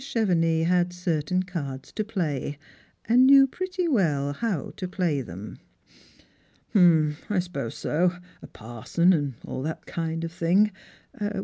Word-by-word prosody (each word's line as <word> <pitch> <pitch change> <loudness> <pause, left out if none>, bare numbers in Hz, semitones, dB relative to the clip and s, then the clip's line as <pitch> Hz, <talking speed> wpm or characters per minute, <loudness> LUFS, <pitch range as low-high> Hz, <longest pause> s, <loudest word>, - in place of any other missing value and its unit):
Chevenix 170 -10 +1
had 175 0 +2
certain 180 0 -1
cards 140 -8 -6
to 215 - -2
play, 155 - -3 0.5
and 250 +3 +5
knew 275 0 +8
pretty 365 +5 -3
well 150 - +1
how 195 -3 -3
to 185 - -4
play 175 -6 -1
them. 100 -2 -9 0.5
" - - -33
Hump, 160 -6 +4
I 210 - 0
suppose 165 -10 -3
so; 175 +3 +1 0.3
a - - -10
parson 120 +11 0
and 145 -6 -1
all - - -5
that 155 +3 -5
kind 165 0 -3
of 165 - -4
thing. 180 +5 +2
170 Hz, 140 wpm, -26 LUFS, 150-190 Hz, 0.5 s, knew